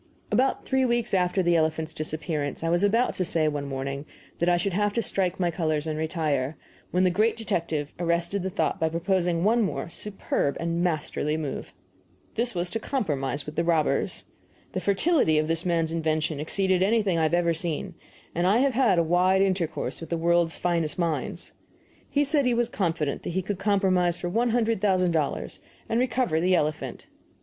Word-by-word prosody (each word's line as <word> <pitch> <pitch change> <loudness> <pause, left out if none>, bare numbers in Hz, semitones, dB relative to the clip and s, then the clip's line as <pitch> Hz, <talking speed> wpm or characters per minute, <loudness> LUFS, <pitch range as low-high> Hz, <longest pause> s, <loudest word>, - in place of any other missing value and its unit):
About 265 +2 +1
three 265 0 +2
weeks 240 -3 0
after 185 0 +2
the 175 0 +3
elephant's 160 0 0
disappearance 155 -1 -3
I 165 - 0
was 175 +3 +2
about 230 +5 +3
to 185 - +1
say, 165 -3 +1
one 145 -2 -2
morning, 140 +1 -4 0.3
that 170 - +2
I 175 - +4
should 185 +2 -1
have 205 +2 +1
to 230 - 0
strike 185 -2 -1
my 175 -2 +1
colors 155 -3 -1
and 155 -1 -2
retire, 155 -3 -1 0.3
when 180 +1 +2
the 185 - +4
great 215 +5 +2
detective 165 -8 -2
arrested 170 +3 0
the 190 - -2
thought 190 - -1
by 160 -1 +1
proposing 170 0 0
one 230 +4 +3
more 195 -4 -2
superb 195 -9 -2
and 170 0 -1
masterly 155 -3 -1
move. 150 -4 -5 0.6
This 235 -1 0
was 175 0 -2
to 225 - -1
compromise 145 - -2
with 150 - -7
the 170 - +1
robbers. 165 -3 +1 0.5
The 185 - -2
fertility 200 - +2
of 155 0 +1
this 165 +2 -1
man's 165 -2 +1
invention 155 -2 -1
exceeded 185 +4 +1
anything 200 -3 +2
I - - +2
have 170 - +2
ever 170 -1 +2
seen, 165 -1 -3 0.4
and 175 +2 +1
I 200 +4 +4
have 270 +1 +2
had 230 -7 +3
a 170 - +4
wide 180 +3 +3
intercourse 185 -5 -1
with 165 - -7
the 170 - -1
world's 170 0 +2
finest 170 -3 -1
minds. 170 -3 -2 0.6
He 290 - +2
said 285 -2 +1
he 245 - +2
was 240 0 +1
confident 165 - -1
he 185 +2 -2
could 190 0 -3
compromise 190 -4 +2
for 175 - -3
one 235 +6 +1
hundred 230 -3 +1
thousand 185 -3 +2
dollars 155 -4 -2 0.3
and 225 - +1
recover 245 -9 +1
the 185 +1 +3
elephant. 150 -2 -2
175 Hz, 190 wpm, -26 LUFS, 160-200 Hz, 0.6 s, I